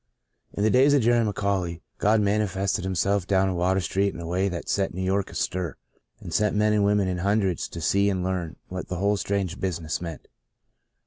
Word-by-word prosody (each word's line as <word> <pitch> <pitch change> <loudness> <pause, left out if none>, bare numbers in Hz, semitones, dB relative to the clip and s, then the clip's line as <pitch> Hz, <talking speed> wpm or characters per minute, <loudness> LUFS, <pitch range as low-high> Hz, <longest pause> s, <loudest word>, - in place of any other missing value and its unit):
IN 100 - -2
the 110 - +3
days 135 +3 +5
of 135 - +3
Jerry 120 0 +4
McAuley, 100 -5 -1 0.2
God 105 +1 +3
man 105 +1 +2
ifested 95 -2 -1
Himself 95 +1 0
down 95 -1 +3
in 95 - -2
Water 90 +2 +1
Street 100 +2 0
in - - -7
a 85 - -6
way 90 +4 0
that 85 -2 -5
set 95 -3 0
New 95 - -3
York 95 +1 0
astir 90 -4 -3 0.4
and 85 - -8
sent 105 +4 +2
men 105 0 +3
and 105 -1 +3
women 100 -1 +2
in 90 -1 -2
hundreds 100 -2 0
to - - -7
see 100 +5 +2
and 95 -2 -1
learn 90 -3 -2
what 90 0 -6
the 90 - -4
whole 100 +3 +1
strange 100 -3 -2
business 85 -4 -2
meant. 85 -3 -7
95 Hz, 210 wpm, -25 LUFS, 90-100 Hz, 0.4 s, days